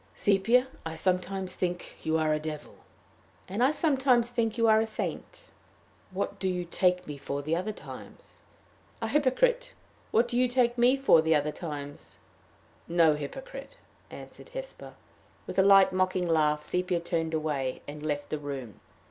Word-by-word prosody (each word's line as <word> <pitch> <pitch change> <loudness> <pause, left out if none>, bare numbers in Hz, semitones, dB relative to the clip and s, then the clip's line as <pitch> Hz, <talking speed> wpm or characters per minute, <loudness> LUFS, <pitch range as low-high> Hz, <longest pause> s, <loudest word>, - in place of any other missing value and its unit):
"Sepia, 225 +6 +3 0.2
I 160 0 -5
sometimes 185 +2 -1
think 175 -1 -4
you 160 0 +1
are 155 -1 +1
a 155 - 0
devil." 155 -1 -6 0.7
"And 200 +6 -1
I 265 - +5
sometimes 265 -6 +2
think 230 -2 -1
you 230 - +3
are 220 0 +6
a - - +1
saint." 220 - -6 0.6
"What 200 +1 -4
do 190 - 0
you 180 -1 -2
take 180 +1 +1
me 145 -1 -7
for 140 +1 -4
the 155 +3 0
other 185 +5 -2
times?" - - -12 0.6
"A - - -2
hypocrite. 485 - +1 0.4
What 235 +2 +3
do 240 0 -2
you 250 - +4
take 245 -1 +2
me 250 +2 +4
for 270 -12 +5
the 160 0 +3
other 150 0 +1
times?" 145 -4 -7 0.7
"No 165 -2 +4
hypocrite," 270 - -7 0.3
answered - - -12
Hesper. - - -8 0.5
With - - -3
a - - +8
light, 195 -1 +6
mocking 185 -1 +1
laugh, 150 -2 +2
Sepia 180 -1 0
turned 165 -1 -2
away, 145 -5 -2
and 150 +1 -8
left 145 -1 -3
the 155 - -2
room. 135 -8 -7
180 Hz, 165 wpm, -28 LUFS, 155-235 Hz, 0.7 s, a